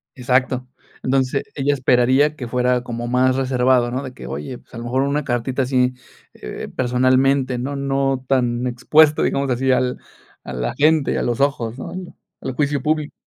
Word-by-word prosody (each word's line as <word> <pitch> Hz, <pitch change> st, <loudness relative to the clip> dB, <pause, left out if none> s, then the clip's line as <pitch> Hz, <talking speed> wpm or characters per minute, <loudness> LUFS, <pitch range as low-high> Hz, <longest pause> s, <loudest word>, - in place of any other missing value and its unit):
Exacto. 130 Hz, 0 st, 0 dB, 0.4 s
Entonces, 130 Hz, +1 st, +1 dB
ella 145 Hz, 0 st, +1 dB
esperaría 130 Hz, +3 st, +3 dB
que 125 Hz, -5 st, -6 dB
fuera 125 Hz, 0 st, +1 dB
como 120 Hz, 0 st, -5 dB
más 130 Hz, +1 st, +2 dB
reservado, 125 Hz, -2 st, +2 dB
¿no? 130 Hz, +3 st, -3 dB
De 130 Hz, -, -7 dB
que: 60 Hz, -, -10 dB
"Oye, 75 Hz, -, -5 dB
pues, -, -, -28 dB
a -, -, -8 dB
lo 115 Hz, -, -6 dB
mejor 130 Hz, +3 st, 0 dB
una 145 Hz, +2 st, 0 dB
cartita 125 Hz, +1 st, -1 dB
así, 125 Hz, -1 st, +1 dB, 0.4 s
eh, -, -, -7 dB
personalmente, 130 Hz, +1 st, +2 dB
¿no?, 135 Hz, +4 st, -3 dB
no 135 Hz, -1 st, 0 dB
tan 125 Hz, -2 st, +1 dB
expuesto, 150 Hz, +5 st, +4 dB
digamos, 140 Hz, 0 st, 0 dB
así 130 Hz, +1 st, +1 dB
al 125 Hz, 0 st, +1 dB, 0.4 s
a 65 Hz, -, -7 dB
la 60 Hz, -1 st, -2 dB
gente, 155 Hz, 0 st, +3 dB
a -, -, 0 dB
los 120 Hz, -1 st, -1 dB
ojos, 130 Hz, -4 st, 0 dB
¿no?, -, -, -6 dB, 0.5 s
al -, -, -3 dB
juicio 145 Hz, -1 st, 0 dB
público". 155 Hz, 0 st, -1 dB
130 Hz, 175 wpm, -20 LUFS, 125-140 Hz, 0.5 s, expuesto